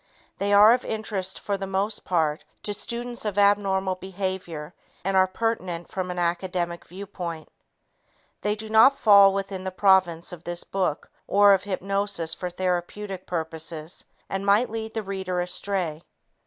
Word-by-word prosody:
They 200 +1 0
are 210 +3 +8
of 250 - 0
interest 205 -4 -3
for 200 -1 -2
the 195 0 -5
most 195 +3 0
part, 160 -4 0 0.2
to 205 - -2
students 240 +3 -6
of 210 -2 -3
abnormal 200 -2 +3
behavior 185 -4 -5 0.3
and 195 0 +1
are 190 0 +5
pertinent 185 -4 -3
from 185 -1 -3
an 180 - -4
academic 175 0 -2
viewpoint. 180 -4 -7 0.9
They 210 0 0
do 220 +1 -7
not 220 +6 +6
fall 200 -4 +7
within 195 -1 -4
the 190 - -2
province 185 -3 +3
of 175 -2 -10
this 175 0 -4
book 185 -6 -2 0.2
or 205 0 +6
of 190 0 +1
hypnosis 195 -3 -1
for 180 - -4
therapeutic 185 +2 -3
purposes 160 -1 -3 0.2
and 195 0 -3
might 205 +4 +3
lead 220 0 -5
the 220 - -2
reader 190 -2 -3
astray. 175 -3 -2
190 Hz, 155 wpm, -25 LUFS, 175-205 Hz, 0.9 s, are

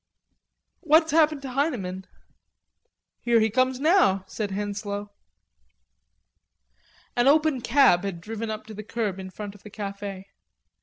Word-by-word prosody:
"What's 320 0 +4
happened 305 -2 +3
to 265 - -5
Heineman?" 210 - -2 1.1
"Here 235 -1 +3
he 220 -1 +2
comes 255 +2 +1
now," 300 - +3
said 210 0 -4
Henslowe. 205 +1 -4 2.0
An 240 +2 +3
open 300 -2 +3
cab 235 -7 +4
had 195 -4 -4
driven 220 +4 -5
up 215 0 -5
to 220 - -10
the 215 - -7
curb 215 -3 -3
in 190 0 -7
front 205 +1 -7
of 205 - -17
the 210 - -11
cafe. 200 -1 -7
220 Hz, 135 wpm, -25 LUFS, 200-270 Hz, 2.0 s, What's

